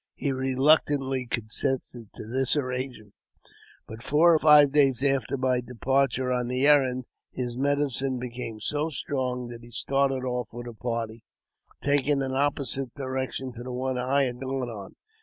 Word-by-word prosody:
He 140 - -1
reluctantly 135 0 +2
consented 120 0 -3
to - - -8
this 130 +5 0
arrangement; 125 -5 -4 0.7
but, 110 +1 -10
four 155 +6 +4
or 160 - +4
five 150 -2 +7
days 135 -3 +3
after 135 -1 +1
my 130 -1 +1
departure 125 +1 0
on 125 -1 -1
the 125 +2 0
errand, 130 -4 +4 0.3
his 120 -2 -4
medicine 135 -1 0
became 120 -3 -6
so 150 +6 -1
strong 130 -4 -3
that 120 -1 -9
he 120 - -13
started 135 +2 0
off 125 -2 -2
with 120 +1 -7
a 120 - -7
party, 115 -1 -4 0.6
taking 140 0 +2
an 130 0 -3
opposite 135 -2 0
direction 130 -1 -4
to 120 - -9
the 125 +1 -6
one 130 0 -2
I 135 +3 +2
had 125 -2 -3
gone 130 -1 -3
on. 100 -4 -9
130 Hz, 160 wpm, -26 LUFS, 125-140 Hz, 0.7 s, five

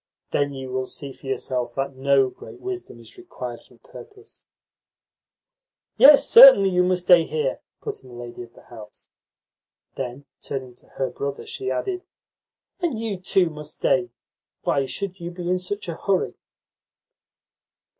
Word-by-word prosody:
Then 145 -1 0
you 130 -1 -7
will 130 0 -2
see 140 -2 -7
for 135 - -14
yourself 125 -2 -3
that 135 0 -3
no 135 0 +3
great - - -13
wisdom 375 -1 -7
is - - -15
required 360 0 -8
for - - -21
the - - -28
purpose." 415 -3 -14 1.5
"Yes, 285 0 +8
certainly 470 - +9
you 180 0 +3
must 180 0 +1
stay 175 -2 +6
here," 470 - -2 0.2
put 430 - -6
in 130 - -16
the 120 - -12
lady 120 0 -8
of 120 -1 -12
the - - -17
house. 110 -3 -14 0.8
Then, 130 +2 -6 0.2
turning 130 -3 -6
to - - -20
her 135 - -1
brother, 140 0 -5
she 395 - -5
added: 370 -2 -2 0.8
"And 335 - -1
you 220 -4 -3
too 180 -1 +1
must 150 0 -8
stay. 125 -2 +1 0.5
Why 135 -1 +1
should 195 +5 -5
you 170 0 -5
be 175 0 -7
in 180 +1 +1
such 190 +2 -5
a 170 - -3
hurry?" 190 +3 -1
165 Hz, 160 wpm, -23 LUFS, 130-205 Hz, 1.5 s, certainly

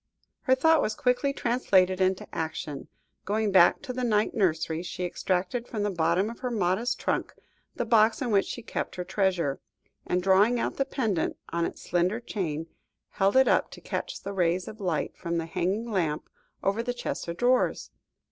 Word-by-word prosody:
Her 260 - +3
thought 320 +4 +4
was 215 - -1
quickly 250 +4 +1
translated 195 -8 +2
into 185 0 +1
action. 155 -3 -4 0.4
Going 210 +1 0
back 180 -2 +5
to 255 - -5
the 255 0 -3
night 215 -3 +2
nursery, 165 -5 0
she 180 0 -4
extracted 185 +6 -1
from 215 -3 -3
the 205 - 0
bottom 170 +3 +1
of 230 +1 -7
her 255 - -2
modest 220 +3 0
trunk, - - -2 0.4
the - - -2
box 220 -1 +4
in 250 -4 -2
which 200 -2 +3
she 240 - -6
kept - - -4
her 180 - -3
treasure, 185 -6 0 0.5
and 180 0 0
drawing 200 +6 +4
out - - -2
the 275 - +1
pendant 225 - -1
on 170 0 0
its - - -6
slender 180 +5 +1
chain, 165 -9 -3 0.5
held 195 +5 +2
it 265 - +6
up - - +3
to - - -11
catch - - -5
the 200 - -4
rays 180 -1 +1
of 215 0 -9
light 175 -5 -1
from 170 -1 -3
the 165 - -2
hanging 195 +8 -2
lamp 165 -7 -1 0.4
over 200 +4 +1
the 245 +1 -3
chest 245 - -4
of 170 0 -4
drawers. 250 +1 +1
195 Hz, 185 wpm, -27 LUFS, 175-235 Hz, 0.5 s, it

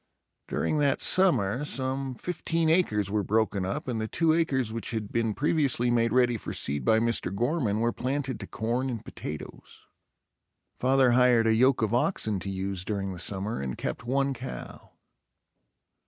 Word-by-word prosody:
During 155 - -1
that 140 -2 +2
summer 135 - +3
some 135 -2 -2
fifteen 165 +1 -1
acres 105 - +1
were 105 0 +1
broken 105 -1 0
up 95 - -4
and 115 -3 -2
the 110 - -2
two 160 +6 +2
acres 135 -9 0
which 115 - -3
had 110 -3 -4
been 115 -2 0
previously 135 -4 +2
made 115 -1 +2
ready 120 -1 +3
for - - -6
seed 70 -1 -2
by 110 - +4
Mr. 115 -5 0
Gorman, 120 -3 0
were 120 0 +1
planted 130 -2 -2
to 100 - -6
corn 120 +4 -2
and 115 -4 -5
potatoes. - - -9 0.9
Father 130 0 +3
hired 125 -2 +4
a 110 - +4
yoke 125 +1 +3
of 110 0 0
oxen 120 - +1
to 100 - -5
use 95 -1 -3
during 100 -1 -3
the 90 - -9
summer 100 +1 -3
and 65 -2 -4
kept - - -4
one 135 +3 0
cow. 130 +1 -9
120 Hz, 170 wpm, -27 LUFS, 105-135 Hz, 0.9 s, by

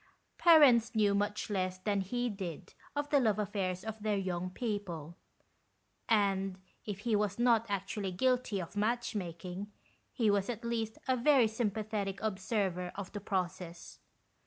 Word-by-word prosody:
Parents 270 -10 +6
knew 205 -2 +4
much 205 +1 0
less 185 -2 -1
than 200 +1 0
he 245 +6 -1
did 190 -7 -6 0.2
of 290 0 -2
the 285 - +5
love 220 -5 +2
affairs 195 -3 -2
of 220 -1 -5
their 210 -1 +1
young 185 -2 -2
people; 185 - -4 0.9
and 195 -3 +2 0.3
if 205 -2 -5
he 225 -1 +1
was 205 -1 0
not 235 -2 +3
actually 200 0 -2
guilty 250 +1 +1
of 175 +1 -7
match 235 +4 0
making, 180 +1 -5 0.4
he 225 -5 +2
was 200 +1 +1
at 235 -1 -4
least 225 -2 -2
a 260 - +3
very 255 -1 +5
sympathetic 215 -3 -2
observer 190 -3 -1
of 195 -2 -6
the 205 - -6
process. 180 -3 -4
205 Hz, 150 wpm, -33 LUFS, 190-225 Hz, 0.9 s, Parents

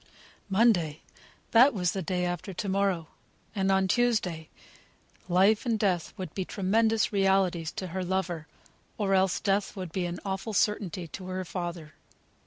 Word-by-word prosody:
Monday: 190 -8 +2 0.5
that 250 +3 +6
was 180 -3 +1
the 195 - -3
day 180 +1 -1
after 175 +2 -4
to 205 - -3
morrow, 190 -4 0 0.4
and 195 -2 +1
on 190 0 +3
Tuesday, 190 -8 +1 0.8
life 195 +5 +4
and 230 -3 0
death 185 -6 0
would 185 -4 -6
be 190 - -2
tremendous 220 +4 +1
realities 190 -4 +2
to 190 - -4
her 185 +1 -3
lover; 175 -3 -2 0.5
or 200 -2 0
else 190 -1 +3
death 200 0 0
would 185 -4 -6
be 180 0 -1
an 175 0 -5
awful 195 +3 -3
certainty 190 -5 0
to 185 +4 -8
her 185 0 -3
father. 170 -3 -5
190 Hz, 155 wpm, -28 LUFS, 175-200 Hz, 0.8 s, that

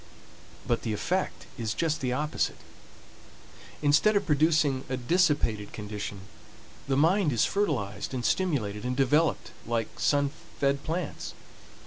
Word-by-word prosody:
But 120 - 0
the 110 - -2
effect 180 - -2
is 110 -2 -2
just 155 -2 0
the 125 -2 0
opposite. 150 +4 -1 1.3
Instead 150 +9 +4
of 200 - +2
producing 150 -3 +3
a 130 - -1
dissipated 130 - +1
condition, 105 -2 -5 0.7
the 135 -1 +1
mind 165 +2 +4
is 120 - +3
fertilized 120 - -1
and 125 -3 -3
stimulated 120 - 0
and 125 +1 -2
developed 150 +4 +2 0.2
like 115 -2 -2
sun 140 +3 +2 0.3
fed 140 0 +1
plants. 165 0 -4
140 Hz, 125 wpm, -28 LUFS, 115-160 Hz, 1.3 s, Instead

